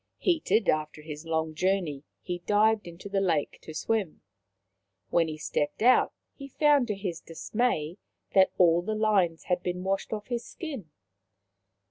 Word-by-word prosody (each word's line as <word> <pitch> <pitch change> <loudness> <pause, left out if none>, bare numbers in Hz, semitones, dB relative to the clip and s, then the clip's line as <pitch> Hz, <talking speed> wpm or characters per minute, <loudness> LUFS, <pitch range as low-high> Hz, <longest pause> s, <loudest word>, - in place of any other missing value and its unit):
Heated 315 - +1
after 155 0 0
his 155 +1 -8
long 160 -1 -1
journey, 175 -5 0 0.2
he 175 -1 -3
dived 210 -1 +3
into 170 +3 -9
the 195 -1 0
lake 165 -6 0
to - - -9
swim. 190 +2 -2 0.9
When 165 -1 +3
he 155 -1 -5
stepped 150 +5 -2
out 250 +2 +5 0.2
he 275 - -9
found 290 -2 +3
to 210 - -1
his 180 -4 -4
dismay 170 0 -2 0.3
that 190 -1 +6
all 170 -1 +5
the 215 +4 -3
lines 200 -6 +2
had 180 -1 0
been 180 0 -3
washed 195 +1 -1
off 210 -1 -4
his 240 -1 -3
skin. 275 - -7
185 Hz, 155 wpm, -28 LUFS, 165-215 Hz, 0.9 s, that